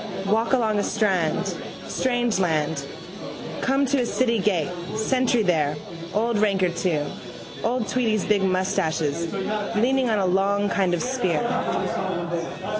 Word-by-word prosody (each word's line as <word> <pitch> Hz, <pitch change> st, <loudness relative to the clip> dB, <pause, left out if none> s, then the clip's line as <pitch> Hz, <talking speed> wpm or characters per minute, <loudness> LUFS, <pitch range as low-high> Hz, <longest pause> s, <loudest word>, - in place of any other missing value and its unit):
Walk 220 Hz, +5 st, +1 dB
along 220 Hz, -5 st, +2 dB
a -, -, +1 dB
strand, 190 Hz, -8 st, 0 dB, 0.3 s
strange 245 Hz, -5 st, 0 dB
land, 155 Hz, -5 st, 0 dB, 0.8 s
come 270 Hz, +1 st, +2 dB
to 275 Hz, +1 st, +2 dB
a -, -, 0 dB
city 235 Hz, -1 st, +1 dB
gate, 185 Hz, -5 st, +1 dB, 0.2 s
sentry 245 Hz, +1 st, +2 dB
there, 155 Hz, -6 st, +2 dB, 0.4 s
old 225 Hz, 0 st, +1 dB
ranker 195 Hz, -3 st, +2 dB
too, 170 Hz, -3 st, 0 dB, 0.6 s
old 240 Hz, -1 st, 0 dB
Tweedy's 220 Hz, -5 st, +1 dB
big 210 Hz, -2 st, +2 dB
moustaches, 170 Hz, -4 st, 0 dB, 0.4 s
leaning 255 Hz, +3 st, +2 dB
on 220 Hz, -, +2 dB
a 195 Hz, -, +1 dB
long 200 Hz, +2 st, +2 dB
kind 185 Hz, -3 st, +2 dB
of -, -, -2 dB
a -, -, -2 dB
spear. 190 Hz, -7 st, -1 dB
200 Hz, 130 wpm, -24 LUFS, 175-235 Hz, 0.8 s, along